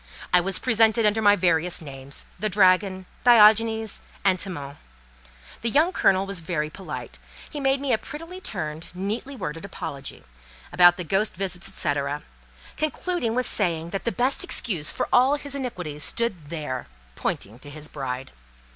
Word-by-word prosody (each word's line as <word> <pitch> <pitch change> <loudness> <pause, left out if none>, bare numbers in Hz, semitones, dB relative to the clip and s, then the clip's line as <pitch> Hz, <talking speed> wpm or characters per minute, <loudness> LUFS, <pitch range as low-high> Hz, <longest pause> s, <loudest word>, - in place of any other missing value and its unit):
I 180 - +7
was 190 +2 +1
presented 225 -2 +4
under 210 +1 +3
my 205 -1 +6
various 175 -2 +1
names: 140 -2 -5
the 215 +3 0
Dragon, 185 -1 +3 0.2
Diogenes, 220 -1 +5 0.2
and 185 -2 +4
Timon. 145 -7 -5 0.8
The 230 - +1
young 315 +9 +3
Colonel 190 - +3
was 195 -2 -2
very 160 -2 -2
polite. 130 - -8 0.3
He 295 - -7
made 270 0 +2
me 275 -2 0
a 220 - +2
prettily 330 +9 -9
turned, 160 - -4
neatly 215 +9 -4
worded 165 - -5
apology, 140 -8 -7 0.5
about 175 -1 +7
the 180 - -3
ghost 195 +6 0
visits, 185 -1 -4
&c., 155 -5 0 0.8
concluding 310 -5 -1
with 255 0 +1
saying 170 -4 0
that 195 - -3
"the 235 - +1
best 260 +11 +2
excuse 180 - -2
for - - -2
all 260 +3 +5
his 285 -1 -4
iniquities 180 - -4
stood 205 -8 0
there!" 145 -5 -5 0.3
pointing 105 - -4
to 145 - -11
his 150 +1 -7
bride. 130 -3 -5
190 Hz, 155 wpm, -25 LUFS, 160-230 Hz, 0.8 s, I